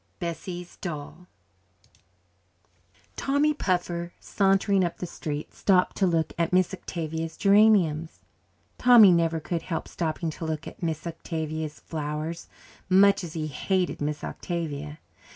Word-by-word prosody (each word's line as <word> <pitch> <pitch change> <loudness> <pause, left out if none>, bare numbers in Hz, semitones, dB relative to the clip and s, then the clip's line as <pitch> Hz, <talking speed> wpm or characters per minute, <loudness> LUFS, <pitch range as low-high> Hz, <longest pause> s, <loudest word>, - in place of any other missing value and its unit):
Bessie's 175 +1 -6
Doll 170 +1 -7 1.9
Tommy 285 +2 +2
Puffer, 175 - -2
sauntering 195 0 +2
up 175 - -2
the - - -4
street, 150 -3 -5
stopped 185 -2 +2
to 195 - +3
look 165 -2 0
at 170 0 +1
Miss 185 0 +2
Octavia's 165 -3 -5
geraniums. 195 -6 +4 0.6
Tommy 240 -6 +8
never 165 -1 +2
could 165 +1 -3
help 165 -3 -4
stopping 160 0 -2
to 160 - -8
look 155 -1 -3
at - - -11
Miss 160 -2 -2
Octavia's 160 -2 -4
flowers, 155 +1 -4 0.4
much 195 +1 +5
as 165 -2 -7
he 160 -2 -3
hated 180 +6 -1
Miss 150 0 -2
Octavia. 150 -4 -4
170 Hz, 125 wpm, -26 LUFS, 160-185 Hz, 1.9 s, Tommy